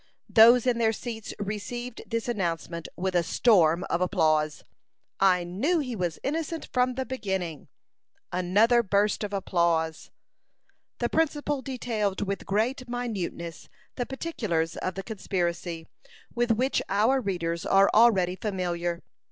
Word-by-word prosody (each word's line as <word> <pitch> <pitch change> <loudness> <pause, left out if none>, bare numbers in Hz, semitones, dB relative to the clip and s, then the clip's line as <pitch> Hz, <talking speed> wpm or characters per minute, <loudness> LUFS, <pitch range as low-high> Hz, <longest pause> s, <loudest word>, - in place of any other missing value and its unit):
Those 235 +2 +7
in 245 -2 +2
their 225 -1 +3
seats 225 -1 -6
received 215 +4 -5
this 230 0 -2
announcement 170 -6 -2
with 185 +1 -2
a 175 - +3
storm 170 -2 +3
of 170 - -1
applause. 155 -4 +1 0.6
"I 185 -2 +4
knew 210 - 0
he 255 -6 -2
was 175 -5 -2
innocent 320 +2 -3
from 250 0 +2
the 260 0 -2
beginning." 190 - -4 0.6
Another 205 +7 +3
burst 205 0 +1
of 205 - -3
applause. 170 -5 0 0.9
The 240 - 0
principal 295 -1 0
detailed 230 -7 -2
with 200 0 -4
great 240 +5 -1
minuteness 200 -9 -4 0.3
the 245 - -3
particulars 215 - -2
of 185 - -3
the 195 - -5
conspiracy, 175 -5 -3 0.5
with 240 0 0
which 250 +4 +2
our 225 +7 +3
readers 170 -5 -2
are 195 0 +5
already 195 -6 +5
familiar. 175 -3 -3
205 Hz, 130 wpm, -27 LUFS, 175-240 Hz, 0.9 s, Those